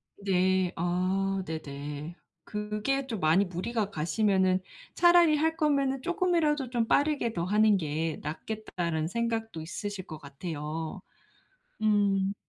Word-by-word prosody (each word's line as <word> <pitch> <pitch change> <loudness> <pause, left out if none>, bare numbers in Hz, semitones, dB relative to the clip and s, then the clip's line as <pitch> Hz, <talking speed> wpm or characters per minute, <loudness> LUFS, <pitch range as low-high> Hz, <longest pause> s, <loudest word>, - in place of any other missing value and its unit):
네. 185 -2 +1
아 185 +3 0
네네. 150 0 -6 0.3
그게 210 +6 -2
좀 225 -5 -3
많이 160 +5 +4
무리가 200 +4 -2
가시면은 185 +3 +2 0.3
'차라리 345 -3 +6
할 320 +2 +1
거면은 275 -4 +1
쪼끔이라도 335 - +1
좀 235 -2 0
빠르게 285 -5 +2
더 170 - -2
하는 210 +3 +4
게 160 -1 -2
낫겠다.'라는 170 -1 -3
생각도 225 -3 -2
있으실 195 +3 -5
것 155 - -7
같아요. 155 +4 -5 0.8
음 200 -2 +2
195 Hz, 250 characters per minute, -29 LUFS, 170-235 Hz, 0.8 s, 차라리